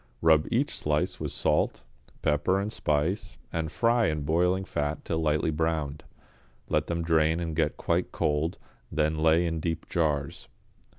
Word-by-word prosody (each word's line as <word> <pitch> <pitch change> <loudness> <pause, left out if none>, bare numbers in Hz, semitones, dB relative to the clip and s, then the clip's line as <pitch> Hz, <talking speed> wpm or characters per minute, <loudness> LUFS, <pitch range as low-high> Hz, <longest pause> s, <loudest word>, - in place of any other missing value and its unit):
Rub 80 -1 +5
each 130 +5 0
slice 75 0 0
with - - -3
salt, 75 -1 0 0.4
pepper 75 +6 +2
and 105 +3 -3
spice, 75 +7 -1 0.2
and 80 -1 -2
fry 115 +5 +2
in 75 -1 -1
boiling 90 +5 +1
fat 75 -1 -3
till 80 - -1
lightly 75 0 +1
browned. 75 -2 -2 0.6
Let - - +1
them 85 0 -1
drain 80 0 +2
and 80 -2 -3
get 80 - 0
quite - - 0
cold, 75 +3 0 0.3
then 75 0 0
lay 80 +2 +4
in 80 -1 -1
deep 80 0 -3
jars. 75 -4 -1
80 Hz, 155 wpm, -28 LUFS, 75-85 Hz, 0.6 s, Rub